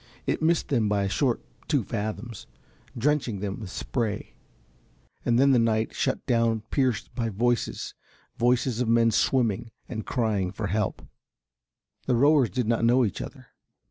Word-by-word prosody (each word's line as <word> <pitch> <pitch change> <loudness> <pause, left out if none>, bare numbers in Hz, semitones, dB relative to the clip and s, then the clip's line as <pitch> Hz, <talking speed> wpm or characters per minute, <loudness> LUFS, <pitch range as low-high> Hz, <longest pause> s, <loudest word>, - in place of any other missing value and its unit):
It - - -1
missed 165 +1 +2
them 115 -6 +2
by 100 -1 +1
a 100 - 0
short 125 +3 0 0.2
two 145 -6 +2
fathoms, 110 +1 -5 0.5
drenching 130 -5 0
them 100 0 -4
with 105 -4 -7
spray, 110 +1 -3 0.9
and 120 -1 +2
then 135 +2 +5
the 125 - +5
night 110 -1 +1
shut - - -1
down 115 -2 +2
pierced 130 -6 0
by 115 -3 -1
voices, 120 +4 -1 0.4
voices 125 0 +1
of 125 - 0
men 115 0 +4
swimming 115 -2 +1 0.2
and 110 -3 -5
crying 105 -6 0
for 105 +2 -4
help. 105 +1 -1 1.0
The 130 - +3
rowers 140 0 +4
did 125 -4 -2
not 115 0 +1
know 120 +2 +4
each 100 - -3
other. - - -9
115 Hz, 155 wpm, -26 LUFS, 110-125 Hz, 1.0 s, then